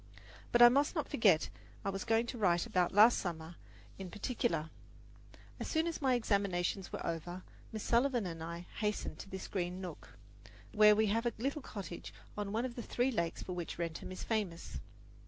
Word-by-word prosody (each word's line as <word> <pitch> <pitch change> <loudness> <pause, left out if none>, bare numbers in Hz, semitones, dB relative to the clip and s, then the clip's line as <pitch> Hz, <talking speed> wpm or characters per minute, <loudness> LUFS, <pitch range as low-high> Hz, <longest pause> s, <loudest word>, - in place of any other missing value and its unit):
But 240 0 +7
I 240 - +11
must 280 +7 +2
not 305 - -1
forget 190 -8 +4
that - - -4 0.4
I - - +1
was 195 +1 -4
going 225 0 +3
to 240 - -5
write 175 -4 +3
about 180 -1 +1
last 215 +4 +7
summer 165 -2 -4 0.5
in 190 -2 -6
particular. 205 -6 -1 0.9
As - - -3
soon 320 0 +1
as 335 -2 -3
my 260 -2 +3
examinations 200 -4 0
were - - -5
over, 175 +2 -4 0.3
Miss 215 -1 -5
Sullivan 240 -2 +2
and 165 -2 -5
I 170 +1 -5 0.2
hastened 210 -1 -2
to - - -9
this 190 0 -6
green 180 -1 -2
nook, 180 -5 -9 0.5
where 210 -1 +7
we 220 +1 +3
have 230 +2 +1
a 235 - -1
little 275 +6 -2
cottage 195 -8 -7 0.2
on 205 -1 -3
one 225 +4 0
of 250 - -4
the 240 - -5
three 245 +3 0
lakes 170 -8 -2
for 185 - -5
which 175 -2 -5
Wrentham 170 +1 -4
is 185 - -6
famous. 205 -7 -2
205 Hz, 195 wpm, -34 LUFS, 175-235 Hz, 0.9 s, I